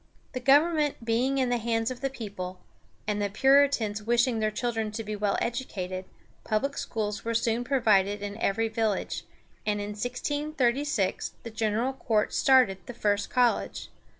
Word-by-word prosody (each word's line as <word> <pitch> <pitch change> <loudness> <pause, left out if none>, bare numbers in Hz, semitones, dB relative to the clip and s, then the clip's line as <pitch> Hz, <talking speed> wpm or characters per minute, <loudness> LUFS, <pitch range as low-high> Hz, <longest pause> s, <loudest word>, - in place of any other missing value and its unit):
The 255 - -4
government 295 0 +3
being 245 +4 +1
in 260 -2 +1
the 245 -1 +1
hands 225 +1 0
of 250 -1 -7
the 270 - 0
people, 200 -7 -6 0.5
and 210 -1 -1
the 205 - 0
Puritans 265 -3 +3
wishing 235 +1 +2
their 215 0 +1
children 225 0 -2
to 225 +1 -4
be 210 0 -4
well 205 -1 0
educated, 190 -7 -3 0.4
public 275 +7 -1
schools 210 -2 -3
were 230 0 -2
soon 230 +1 +1
provided 210 -6 +2
in 205 0 -4
every 225 +2 +1
village, 220 -2 -1 0.4
and 210 -1 0
in 205 0 -4
1636 255 +1 -1
the 230 - -7
General 225 +4 0
Court 220 -5 0
started 255 -9 +4
the 245 - -7
first 205 -2 0
college. 245 -2 +1
230 Hz, 155 wpm, -28 LUFS, 210-255 Hz, 0.5 s, started